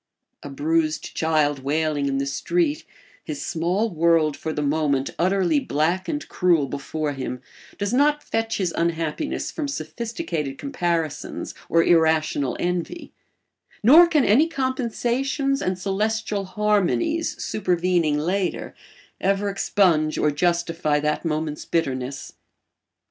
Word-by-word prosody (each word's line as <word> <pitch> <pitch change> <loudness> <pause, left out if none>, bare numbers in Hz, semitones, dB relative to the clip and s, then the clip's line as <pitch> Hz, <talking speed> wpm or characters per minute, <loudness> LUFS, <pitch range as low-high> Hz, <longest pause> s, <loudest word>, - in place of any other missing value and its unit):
A 145 - -8
bruised 155 +3 -1
child 155 -3 +1
wailing 145 +1 0
in 135 0 0
the 140 - 0
street, 315 - -1 0.4
his 295 - -5
small 185 +6 0
world 165 -2 +3
for 160 - -4
the 150 -1 -2
moment 145 -2 0
utterly 180 -4 +2
black 165 +7 0
and 295 0 -3
cruel 175 -5 +2
before 145 +3 -3
him, 130 -2 -5 0.4
does 205 +2 -2
not 295 +3 +3
fetch 225 0 -1
his 180 -4 -1
unhappiness 165 - -2
from 305 -3 -3
sophisticated 230 - -4
comparisons 175 - -3 0.2
or 165 0 +4
irrational 160 -5 +2
envy; 180 - -3 0.7
nor 315 +10 +8
can 305 -6 +2
any 270 +11 +5
compensations 270 0 -1
and 185 0 -1
celestial 205 +1 -1
harmonies 210 - 0
supervening 175 -6 +1
later 180 +4 -2 0.5
ever 195 +1 +1
expunge 175 -6 +2
or 150 - +2
justify 165 -1 0
that 150 +1 -1
moment's 155 -2 -2
bitterness. 135 -4 -3
170 Hz, 120 wpm, -23 LUFS, 155-220 Hz, 0.7 s, nor